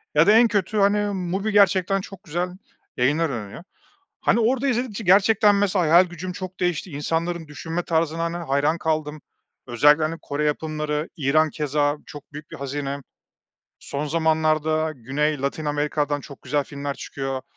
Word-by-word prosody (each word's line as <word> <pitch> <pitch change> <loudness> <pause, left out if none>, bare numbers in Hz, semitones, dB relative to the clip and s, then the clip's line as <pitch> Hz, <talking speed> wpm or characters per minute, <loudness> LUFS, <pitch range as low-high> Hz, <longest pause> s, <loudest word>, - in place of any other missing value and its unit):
Ya 150 +4 +5
da - - +7
en 230 +2 +6
kötü, 210 -1 -1
hani, 205 +1 +3
MUBI 190 +3 -2
gerçekten 195 -1 +3
çok 195 0 -11
güzel 175 +1 -2 0.5
yayınlar 150 +6 +2
öneriyor. 115 +3 -6 0.6
Hani, 235 - +2
orada 255 +4 +1
izledikçe 240 -3 -2
gerçekten, 205 +2 +5
mesela, 200 -2 +2
hayal 170 +4 +6
gücüm 180 +1 -6
çok 185 0 -8
değişti 175 0 -1
insanların 165 +3 -2
düşünme 165 +4 -4
tarzına, 165 0 0
hani, 170 +1 -2
hayran 150 0 0
kaldım 155 -2 -2 0.5
özellikle, 145 +6 +4
hani, 160 +2 -2
Kore 145 +1 -2
yapımları, 150 0 -2
İran 155 +1 +2
keza 145 -1 0
çok 145 -1 -12
büyük 150 +1 -10
bir - - -8
hazine 140 0 -4 0.8
son 145 +2 -4
zamanlarda 155 0 +1
Güney 140 +4 -1
Latin 140 +3 -2
Amerika'dan 145 0 -1
çok 140 0 -12
güzel 145 +2 0
filmler 140 0 -5
çıkıyor. 135 -2 -5
155 Hz, 155 wpm, -23 LUFS, 145-185 Hz, 0.8 s, da